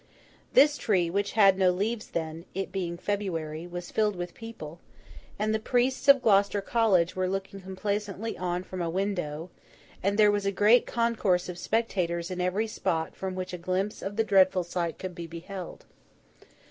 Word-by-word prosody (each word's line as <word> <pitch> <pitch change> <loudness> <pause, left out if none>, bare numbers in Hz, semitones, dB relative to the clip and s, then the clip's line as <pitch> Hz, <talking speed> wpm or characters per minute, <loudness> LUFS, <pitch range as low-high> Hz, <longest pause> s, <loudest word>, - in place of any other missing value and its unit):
This 290 +1 +6
tree, 180 -6 +1
which 200 +2 -1
had 195 -3 +5
no 185 -1 +5
leaves 210 +5 -1
then, 160 0 -4
it 195 0 -3
being 175 -3 -3
February, 170 -5 -3
was 175 0 -7
filled 210 -2 +1
with 175 -1 -5
people; 175 -9 -9 0.6
and 215 +1 0
the 220 - +1
priests 250 +4 0
of 275 -2 +7
Gloucester 200 -1 +4
College 195 -5 +2
were 185 0 0
looking 195 +1 -4
complacently 200 +3 -3
on 180 0 -2
from 185 0 -6
a 170 - -1
window, 175 -3 -3 0.5
and 200 +2 0
there 210 -1 +6
was 205 -1 -1
a - - +2
great 210 +5 +4
concourse 220 -7 +1
of 175 -1 -6
spectators 180 -6 -1
in 180 0 -3
every 185 +5 0
spot 165 -7 -2
from 190 -1 -4
which 185 0 -5
a 180 - -5
glimpse 185 +4 -2
of 200 +1 -5
the 225 - +2
dreadful 190 -3 +4
sight 170 -1 -3
could 185 -1 -6
be 170 -1 -7
beheld. 175 +2 -8
190 Hz, 175 wpm, -28 LUFS, 175-210 Hz, 0.6 s, of